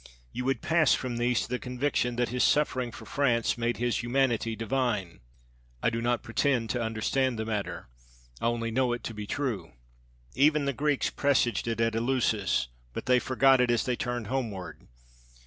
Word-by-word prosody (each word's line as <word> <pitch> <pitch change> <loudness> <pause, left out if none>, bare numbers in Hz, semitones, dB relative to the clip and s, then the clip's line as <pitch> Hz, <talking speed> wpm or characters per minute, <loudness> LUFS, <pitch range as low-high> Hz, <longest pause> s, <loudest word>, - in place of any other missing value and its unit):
You 125 - -4
would 135 +1 0
pass 160 -1 +4
from 125 -2 -4
these 120 0 +1
to - - -6
the 125 +1 -2
conviction 125 -1 -1
that 120 0 0
his 125 +1 0
suffering 130 -5 +2
for - - -11
France 120 -5 +1
made 120 0 -1
his 120 -2 0
humanity 120 -2 +1
divine. 115 -5 -1 0.6
I - - +3
do 115 0 -2
not 120 0 0
pretend 125 -6 0
to 125 - -1
understand 115 +3 0
the 110 - -2
matter. 105 -2 -3 0.5
I - - -1
only 115 -1 -1
know 125 +1 +1
it 120 -1 -5
to 115 - -5
be 105 -1 -6
true. 130 -6 -3 0.6
Even 150 +1 +3
the 140 - 0
Greeks 145 +1 0
presaged 125 -7 +1
it 115 -1 -2
at 115 0 +2
Eleusis, 115 - +1 0.2
but - - -5
they 125 0 +4
forgot 130 +1 +4
it 125 - +2
as 120 -2 +2
they 125 - 0
turned 120 -2 -3
homeward. 110 -6 -4
120 Hz, 180 wpm, -28 LUFS, 115-130 Hz, 0.6 s, pass